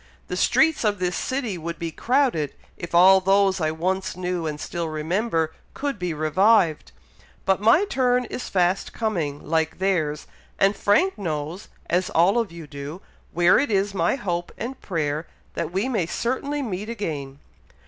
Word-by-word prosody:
The - - -2
streets 320 -3 +3
of 210 -2 +1
this 180 -1 -1
city 245 -9 -2
would 170 +1 -5
be 165 -1 -4
crowded, 240 - +1 0.2
if 170 0 -6
all 190 +2 +7
those 195 0 +3
I 155 - +2
once 190 +5 -2
knew 180 -2 -2
and 150 -1 -4
still 170 0 -4
remember, 160 +1 -1 0.2
could 280 -6 -3
be 180 -1 -2
revived; 165 +3 +2 0.5
but 190 0 +2
my 230 - +5
turn 250 -6 +1
is 245 - -6
fast 180 0 +1
coming, 170 -12 -2
like 160 0 0
theirs, 165 -6 0 0.3
and 195 +1 +3
Frank 350 - +2
knows, 160 0 -4 0.2
as 180 +2 +1
all 185 +8 +3
of 225 -6 -2
you 170 -1 -9
do, 145 +3 -7 0.3
where 175 +1 +4
it 285 - 0
is 200 -1 +1
my 170 +2 +1
hope 175 -8 -3
and 260 +3 -6
prayer 155 -3 -2 0.3
that - - -3
we 195 +7 0
may 215 -10 0
certainly 275 +8 -2
meet 210 -2 -4
again." 150 -12 -4
185 Hz, 165 wpm, -24 LUFS, 165-215 Hz, 0.5 s, all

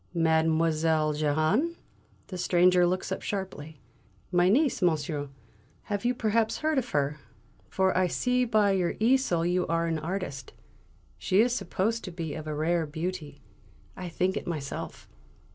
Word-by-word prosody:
"Mademoiselle 160 -1 +2
Jehane?" 155 - +1 0.5
the 185 - -7
stranger 180 0 +4
looks 185 +2 -2
up 190 - -3
sharply. 160 -7 -5 0.5
"My 175 0 +4
niece, 270 +4 +2
monsieur; 155 -3 +1
you 145 -1 -6 0.8
have 250 - -2
perhaps 220 0 +1
heard 310 -2 +1
of 245 -1 -5
her, 145 +1 -1 0.5
for 190 0 +1
I 185 0 +3
see 250 +7 +1
by 215 -4 +3
your 185 -3 0
easel 225 -8 +2
you 180 +1 +1
are 165 0 0
an 165 -1 -1
artist. 155 -6 -5 0.7
She 190 - +1
is 240 +2 +4
supposed 215 +1 -1
to 185 - -6
be 165 -3 -5
of 155 -1 -7
a 155 - -3
rare 160 +1 0
beauty; 160 -2 -5 0.5
I 180 -1 -6
think 185 +3 0
it - - -4
myself." 150 -5 -5
175 Hz, 150 wpm, -28 LUFS, 155-200 Hz, 0.8 s, stranger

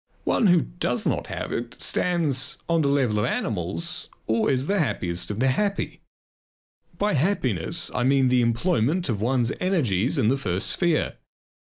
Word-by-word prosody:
One 220 - +2
who 175 -2 +5
does - - -2
not - - -1
have - - -5
it 120 0 -5
stands 155 -7 +1
on 165 -1 +2
the 145 - +1
level 130 -7 +1
of 105 - +1
animals, 85 -8 -1 0.2
or 110 0 +1
is 130 -1 +1
the 200 +4 +1
happiest 90 - -1
of 105 +1 -4
the 130 +2 +3
happy. 200 +9 -1 1.0
By 205 0 +1
happiness 130 - 0
I 125 - 0
mean 135 0 +3
the 125 0 +3
employment 140 +6 +1
of 105 -4 -1
one's 120 +1 +1
energies 140 - +1
in 125 -6 +2
the 135 +4 +2
first 95 -6 -1
sphere. 170 -4 +1
130 Hz, 165 wpm, -24 LUFS, 110-165 Hz, 1.0 s, who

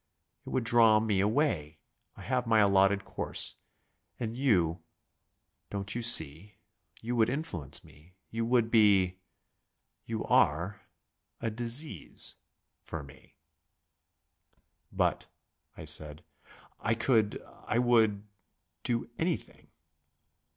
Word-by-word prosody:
It - - -5
would 130 - -1
draw 115 -2 +5
me 110 -3 0
away. 100 - 0 0.4
I - - -11
have 125 -2 -1
my 110 -1 +3
allotted 100 -1 +3
course. - - -1 0.6
And 115 -1 -4
you 90 - +1 0.9
Don't 100 0 -4
you 120 - -3
see, 95 -4 +2 0.5
you 120 +2 -3
would 115 -1 +3
influence 90 - -1
me; 80 +6 -20 0.2
you 115 +1 -2
would 115 -1 +1
be 100 -5 +3 0.9
you 110 -1 -4
are 85 +7 +1 0.6
a 115 - -3
disease 120 - +1 0.5
for 80 -3 -7
me." 70 - -17 1.6
"But," - - -1 0.5
I - - -9
said, 75 0 -1 0.6
"I 115 -1 0
could 115 -3 +1 0.3
I 115 - 0
would 110 -4 +2 0.5
do 120 -1 -2
anything." 165 0 -3
110 Hz, 110 wpm, -29 LUFS, 95-120 Hz, 1.6 s, draw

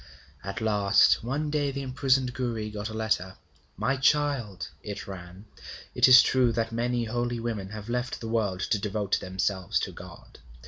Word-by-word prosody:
At 100 +3 -5
last 105 -1 +4
one 145 +5 -2
day 145 -2 +1
the 140 0 -4
imprisoned 130 -1 +1
Gouri 115 -4 -3
got 105 +1 -5
a - - -7
letter. 110 -4 -1 0.4
'My 135 +1 0
child,' 135 -8 +1
it 105 +1 -6
ran, 95 +1 -9 0.5
'it - - +5
is 130 0 +9
true 125 -2 +3
that 115 -1 -1
many 120 +1 -1
holy 120 +1 -2
women 110 -5 -4
have 105 0 -8
left 125 +2 -2
the 115 - -6
world 105 -5 -1
to 105 - 0
devote 105 -1 -1
themselves 95 0 -1
to - - -3
God. - - -13
115 Hz, 170 wpm, -27 LUFS, 100-125 Hz, 0.5 s, is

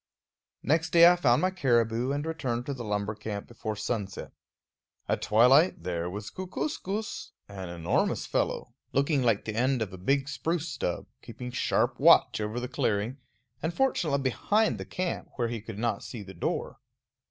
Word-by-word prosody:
Next 160 +3 +2
day 170 +1 +8
I 175 - +7
found 130 -5 +3
my 185 - +3
caribou, 120 -6 +1
and 145 +2 -2
returned 130 -7 -2
to 140 - -3
the 125 -3 -6
lumber 105 -1 -1
camp 105 -1 -6
before 110 -2 -5
sunset. 105 -2 -4 0.8
At - - 0
twilight 125 - +5
there 85 -1 -2
was 105 +2 -6
Kookooskoos, 200 - -4
an 95 -3 -7
enormous 85 -1 0
fellow, - - -1 0.2
looking 140 +1 +2
like 115 -5 +2
the 110 - -3
end 130 +3 +1
of 100 -3 -8
a 95 - -8
big 135 +8 +1
spruce 165 +2 -2
stub, 125 - -3 0.2
keeping 125 0 -8
sharp 125 - 0
watch - - +6
over 105 +3 -2
the 125 - -3
clearing, 115 0 -1 0.4
and 160 +2 -2
fortunately 175 - +1
behind 210 - +1
the - - -5
camp 180 -1 -3
where 120 -2 -1
he 115 -2 -4
could 110 -1 -8
not 115 +1 -1
see 115 -5 -7
the 95 -1 -10
door. 85 - -3
120 Hz, 170 wpm, -28 LUFS, 105-150 Hz, 0.8 s, day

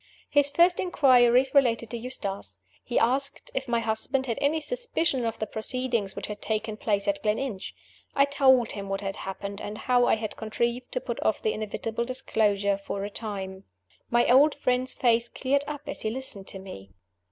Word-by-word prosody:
His 285 -1 +4
first 345 +5 +4
inquiries 260 -6 +4
related 240 -5 +3
to 240 - -2
Eustace. 225 -5 -4 0.3
He 240 - -2
asked 270 +4 +1
if 265 0 -3
my 235 -1 +1
husband 230 +4 -1
had 230 -3 -2
any 295 +3 +2
suspicion 330 - -1
of 225 - -3
the 215 - -2
proceedings 225 -1 -1
which - - -4
had 210 -1 -7
taken 220 0 -2
place 205 -2 -1
at 300 0 0
Gleninch. 215 -2 -2 0.4
I 280 - +5
told 265 -4 +4
him 200 -1 -6
what 195 0 -2
had 195 -1 -3
happened, 200 +1 -6
and 210 +1 -5
how 245 0 +2
I - - +4
had 215 -1 -5
contrived 235 +3 -2
to - - -1
put - - -4
off - - 0
the 435 - +1
inevitable 220 +2 -3
disclosure 210 -6 0
for 200 0 -4
a 205 - -6
time. 195 -3 -4 0.4
My 240 0 +3
old 280 +4 +6
friend's 255 -2 0
face 235 -2 +2
cleared 275 +4 0
up 295 -1 -5
as 285 - -5
he 220 - -1
listened 220 -5 -3
to - - -2
me. 185 - -10
235 Hz, 185 wpm, -27 LUFS, 210-265 Hz, 0.4 s, old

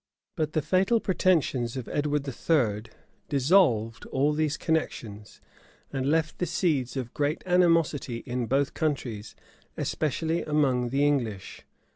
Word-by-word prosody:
But 155 -3 -2
the 155 - 0
fatal 195 - +2
pretensions 160 - +1
of 125 - -5
Edward 145 -1 -1
III. 115 -6 0 0.4
dissolved 130 - +3
all 140 +3 +1
these 155 0 0
connections, 110 -10 -3 0.5
and 135 0 -1
left 160 0 0
the 180 - 0
seeds 140 -8 0
of 125 -2 -4
great 145 +2 -1
animosity 165 -9 +2
in 125 -1 -2
both 135 +3 +1
countries, 125 -9 -3 0.4
especially 160 +2 -1
among 135 -5 +1
the 140 +3 +1
English. 120 -9 -2
145 Hz, 125 wpm, -27 LUFS, 125-160 Hz, 0.5 s, dissolved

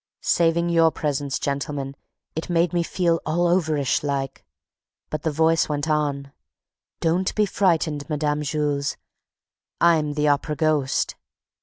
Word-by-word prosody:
Saving 170 0 +2
your 165 -1 +5
presence, 145 -3 -2
gentlemen, 140 -1 -3 0.4
it 160 - -4
made 170 -1 +2
me 175 - +2
feel 170 -1 0
all 170 +3 0
overish 155 -6 +1
like. 140 -2 -3 0.7
But 155 - -2
the 160 - 0
voice 160 +2 +2
went 145 0 -2
on, 145 -3 -1 0.7
'Don't 175 +3 +1
be 215 - +3
frightened, 165 -7 0
Mme. 150 -1 0
Jules, 145 -1 -1 0.8
I'm 160 -3 +3
the 150 0 +1
Opera 145 +1 +1
ghost!' 150 -3 +1
155 Hz, 130 wpm, -23 LUFS, 145-165 Hz, 0.8 s, your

